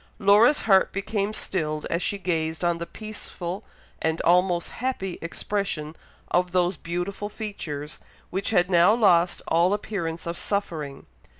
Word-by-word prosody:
Laura's 215 +7 +5
heart 195 -3 +4
became 200 +1 -1
stilled 155 -7 -2
as 170 - 0
she 200 - 0
gazed 160 -3 -1
on 175 -1 +1
the 170 - -4
peaceful 205 -3 -6 0.4
and 160 0 0
almost 175 0 +3
happy 225 -8 -3
expression 170 -3 -3 0.4
of 180 0 +2
those 180 0 +2
beautiful 180 +5 -4
features, 155 -9 -6 0.3
which 195 +1 -1
had 180 -5 +3
now 180 +3 +5
lost 180 -6 +3
all 175 +4 +3
appearance 170 -6 -4
of 170 0 -3
suffering. 160 -9 -3
180 Hz, 135 wpm, -25 LUFS, 170-200 Hz, 0.4 s, Laura's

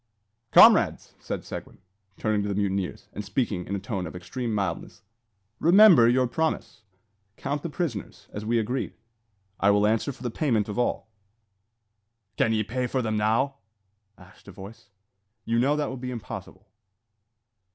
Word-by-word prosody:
"Comrades!" - - +6
said - - -5
Seguin, - - -8 0.4
turning 110 -1 0
to 100 - -3
the 100 - -2
mutineers, 100 -2 -2
and 105 - -5
speaking 100 -3 -2
in 100 - -2
a - - -3
tone 95 -3 -4
of 80 - -10
extreme 115 +7 -5
mildness, 95 -5 -4 0.6
"remember 170 - +7
your 125 +1 +3
promise. 155 -3 -2 0.6
Count 145 0 -3
the 170 - -4
prisoners, 145 - -5
as 105 - -5
we 115 +2 0
agreed. 120 +4 -2 0.6
I 100 - +3
will 105 0 +4
answer 110 +6 +1
for 125 -1 -13
the 120 - -2
payment 115 -7 0
of 105 +3 -4
all." 120 - -1 1.3
"Can 115 - +2
ye 110 -1 +1
pay 125 +4 -2
for 130 +1 -1
them 110 -1 -1
now?" 115 +6 +1 0.6
asked 90 +2 -19
a - - -9
voice. 100 +3 -12 0.6
"You 115 0 +1
know 140 +4 +2
that 150 - 0
that - - -4
would 130 -2 -7
be 125 - -4
impossible." 110 -4 -8
115 Hz, 160 wpm, -26 LUFS, 100-130 Hz, 1.3 s, remember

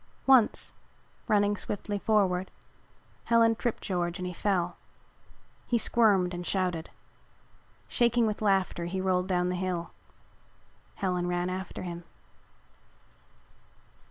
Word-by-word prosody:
Once, 260 -5 +4 0.5
running 205 -1 +3
swiftly 205 0 -4
forward, 190 -4 +1 0.8
Helen 230 -1 +4
tripped 235 0 -3
George 175 -2 -2
and 185 - -5
he 180 - -4
fell. 180 -2 0 0.9
He 240 - +2
squirmed 205 -6 +3
and 175 0 -4
shouted. 180 -3 -1 1.0
Shaking 240 -1 +2
with 215 -1 -2
laughter, 195 -4 +1
he 185 +2 -3
roiled 185 -1 +1
down 180 -1 +1
the 180 - -1
hill. 180 -2 -3 1.0
Helen 180 -2 -1
ran 175 0 -1
after 190 +1 -5
him. 175 -1 -6
185 Hz, 110 wpm, -29 LUFS, 180-210 Hz, 1.0 s, Once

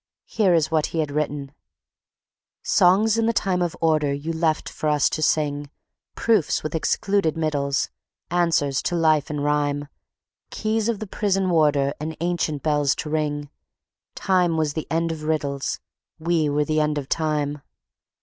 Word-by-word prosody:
Here 195 -6 +2
is 155 -1 +1
what 155 -2 +2
he 165 - -4
had 150 -2 -1
written: 145 -2 -2 1.1
"Songs 210 +4 +4
in 225 - +2
the 230 - +2
time 185 -4 0
of 175 -2 -1
order 155 -3 +2
You 145 +4 -3
left 160 -1 0
for 155 - -2
us 150 -2 +3
to 155 - -2
sing, 145 -2 0 0.5
Proofs 220 -8 +1
with 155 - -4
excluded 165 +1 0
middles, 145 -3 0 0.4
Answers 165 -6 +1
to 175 - -2
life 155 -3 +2
in 150 -1 -3
rhyme, 145 0 0 0.6
Keys 220 +1 -1
of 230 - 0
the 215 - -5
prison 195 -2 0
warder 145 -4 +3
And 155 +1 -5
ancient 170 -4 -1
bells 145 -2 +2
to 150 - -5
ring, 145 -2 -2 0.6
Time 180 -4 +1
was 155 -2 0
the 160 - -4
end 165 +1 0
of 160 -1 -6
riddles, 145 -3 -2 0.4
We 165 -2 +1
were 145 +1 +1
the 155 0 +1
end 150 -1 +1
of 140 -2 -4
time... 150 -2 -1
155 Hz, 160 wpm, -23 LUFS, 145-175 Hz, 1.1 s, Songs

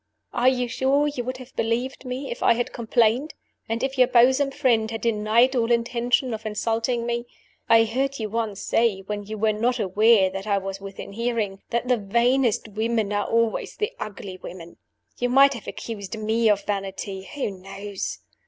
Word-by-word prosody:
"Are 245 +1 +4
you 250 -1 0
sure 270 +4 +2
you 285 -4 -3
would 255 +1 -3
have 255 +1 -13
believed 240 +4 -2
me 255 +2 -4
if - - -6
I - - +5
had 240 +1 -2
complained, 235 +4 +1 0.3
and 230 +2 -1
if 270 0 -2
your 250 - +7
bosom 260 +3 +4
friend 230 -5 +1
had 225 0 -5
denied 230 +3 +3
all 235 -1 +1
intention 240 +1 +1
of 220 0 -5
insulting 225 +2 -1
me? 235 0 -2 0.4
I 225 0 +7
heard 265 +5 -1
you 220 - -3
once 215 -2 -3
say 225 -4 +1
(when 205 +1 -5
you 215 0 -5
were 215 +1 +2
not 240 +3 0
aware 205 0 +4
that 195 +2 -6
I 200 -1 +2
was 195 0 -5
within 195 0 -8
hearing) 225 -3 -2
that 235 +1 -1
the 250 -1 +3
vainest 235 +3 +1
women 220 0 -1
were 205 0 0
always 230 +1 0
the 425 - -2
ugly 195 -3 -7
women. 170 -2 -10 0.4
You 245 - +1
might 275 +2 +6
have 235 - -9
accused 220 -1 -6
me 220 +1 +2
of 205 -1 +2
vanity. 195 -1 -4
Who 275 -7 -2
knows? 195 +1 -6
230 Hz, 185 wpm, -24 LUFS, 210-245 Hz, 0.4 s, your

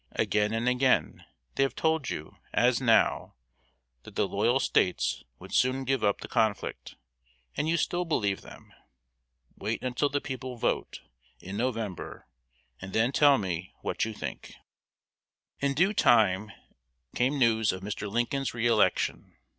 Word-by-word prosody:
Again 105 0 +1
and 115 +2 -1
again 125 - +1 0.3
they - - -1
have 135 - +1
told 160 -3 0
you, 75 - -6 0.2
as 125 +1 +3
now, 115 -3 +2 0.7
that - - -14
the - - +1
loyal - - +2
States - - +1 0.2
would - - -12
soon 130 +1 +2
give 135 -2 0
up 100 -1 +1
the - - -6
conflict, 110 -4 -1 0.6
and 155 - -1
you 170 - +2
still 175 +2 0
believe 105 - -1
them. - - -14 0.8
Wait 110 +3 -3
until 130 +3 0
the 145 +1 0
people 130 -2 -6
vote, - - -2 0.4
in 95 +2 -8
November, 115 -5 -3 0.6
and 95 +1 -8
then 115 +3 +2
tell 145 -1 +5
me 95 -3 -4
what - - -1
you 110 - -1
think." 105 - -7 1.0
In 140 0 0
due 185 +7 +3
time 105 - +3 0.6
came 130 +4 +1
news 110 -4 +3
of 95 0 -7
Mr. 105 +1 -4
Lincoln's 120 +5 -1
re 115 0 -1
election. 110 -6 +1
120 Hz, 145 wpm, -28 LUFS, 105-135 Hz, 1.0 s, tell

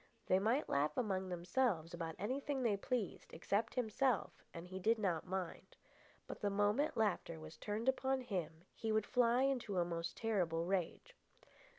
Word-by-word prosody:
They 185 - +4
might 230 +9 +2
laugh 145 +2 +1
among 190 -6 0
themselves 175 -1 0
about 165 -2 -4
anything 265 +4 -1
they 220 -4 +3
pleased 210 0 -3
except 205 +7 0
himself, 250 0 +1 0.2
and 170 +1 -8
he 185 +1 -6
did 225 +5 +3
not 185 -6 0
mind. 185 -2 -4 0.5
But - - -8
the 205 - +2
moment 205 +8 +2
laughter 190 -6 0
was 155 0 -9
turned 215 +6 -3
upon 265 0 +2
him 175 -9 -4
he 225 - -2
would 215 -1 +2
fly 245 +1 +3
into 250 -8 0
a 175 - +3
most 170 0 -3
terrible 175 -7 0
rage. 195 - -2
205 Hz, 165 wpm, -38 LUFS, 175-240 Hz, 0.5 s, They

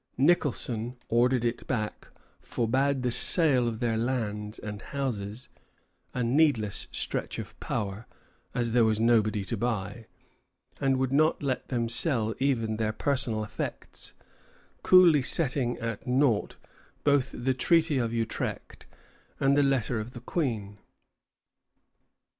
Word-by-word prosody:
Nicholson 125 -5 +1
ordered 120 +1 +2
it 120 0 -3
back, 110 -5 -3 0.3
forbade 130 +3 0
the 125 - 0
sale 135 -3 +4
of 115 -1 -3
their 115 -1 -1
lands 110 -3 -2
and 105 -1 -7
houses, 120 -4 -4 0.6
a 125 - -2
needless 120 -5 +1
stretch - - -3
of - - -7
power, 105 -1 -4 0.5
as 120 -2 0
there 120 0 +4
was 110 -1 +2
nobody 110 -3 +2
to 115 - -3
buy, 110 -1 -3 0.7
and 135 -1 +1
would 130 0 -1
not 155 +1 +2
let 130 -2 -2
them 120 -3 -1
sell 115 -3 +3
even 115 -5 0
their 110 -1 0
personal 120 -2 +1
effects, 105 - -6 0.7
coolly 175 -5 +6
setting 125 -3 +1
at 115 0 -5
nought 125 -4 +1 0.5
both 140 -2 +2
the 130 +2 -1
Treaty 160 +2 +2
of 115 -2 -1
Utrecht 115 -1 -4 0.5
and 135 0 +3
the 145 - +4
letter 130 -4 +1
of 110 +4 -7
the 120 - -8
Queen. 115 - -3
120 Hz, 130 wpm, -28 LUFS, 110-135 Hz, 0.7 s, coolly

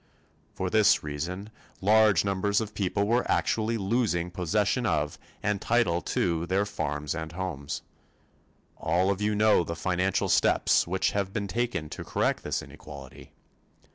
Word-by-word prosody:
For 95 -1 -2
this 105 -1 +4
reason 85 +8 -5 0.3
large 105 -1 +4
numbers 100 +1 +1
of 110 -1 -4
people 100 +1 0
were 120 +4 +1
actually 115 +1 +1
losing 95 -4 0
possession 105 +6 0
of 75 -4 -1 0.2
and 105 -1 0
title 115 -8 +2
to 85 -1 -1
their 95 +3 +1
farms 75 -7 -3
and 80 -1 -5
homes. 75 -5 -4 0.9
All 90 +4 +1
of 100 +1 -3
you 105 0 +1
know 105 -3 +4
the 85 - -4
financial 90 +2 0
steps - - +3
which 95 +2 +1
have 100 -1 -1
been 105 -3 -2
taken 120 -7 -2
to - - -6
correct - - 0
this - - -2
inequality. 70 0 -12
95 Hz, 145 wpm, -27 LUFS, 85-105 Hz, 0.9 s, this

